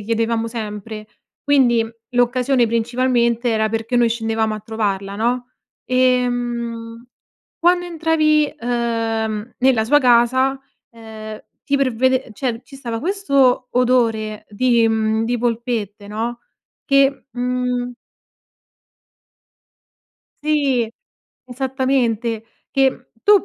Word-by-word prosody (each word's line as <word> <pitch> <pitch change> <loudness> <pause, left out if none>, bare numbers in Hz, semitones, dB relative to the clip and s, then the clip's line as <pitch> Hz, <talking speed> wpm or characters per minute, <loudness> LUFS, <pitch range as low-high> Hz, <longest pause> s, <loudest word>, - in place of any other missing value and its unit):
chiedevamo 230 +1 -1
sempre. 215 -1 -6 0.4
Quindi, 245 -5 +3 0.2
l'occasione 245 0 +2
principalmente, 235 +1 +1
era 220 -1 +1
perché 225 +2 -3
noi 240 -1 +4
scendevamo 225 -1 -1
a 215 - -5
trovarla, 200 -2 -3
no? 245 +3 -1 0.3
Ehm, 240 -2 0 0.5
quando 355 +1 +3
entravi, 310 -3 +2
uhm, 230 -2 -2
nella 250 -4 +3
sua 290 +5 +4
casa, 260 +2 +3 0.3
ehm, 220 -2 -9 0.2
ti 280 - +1
pervede 260 -1 +1
cioè, 235 +1 -3
ci 275 - -13
stava 235 -4 -4
questo 275 - +2
odore 230 -4 +1
di, 235 +1 +2
mhmm, 220 0 +1
di 245 +2 0
polpette, 230 -4 -2
no, 235 +3 -3 0.5
che, 275 -1 +3
mhmm 250 0 -1 2.5
Sì, 280 -6 +1 0.6
esattamente, 250 -3 -1 0.3
che 265 -2 +1
tu 410 -2 +6
240 Hz, 95 wpm, -20 LUFS, 225-260 Hz, 2.5 s, tu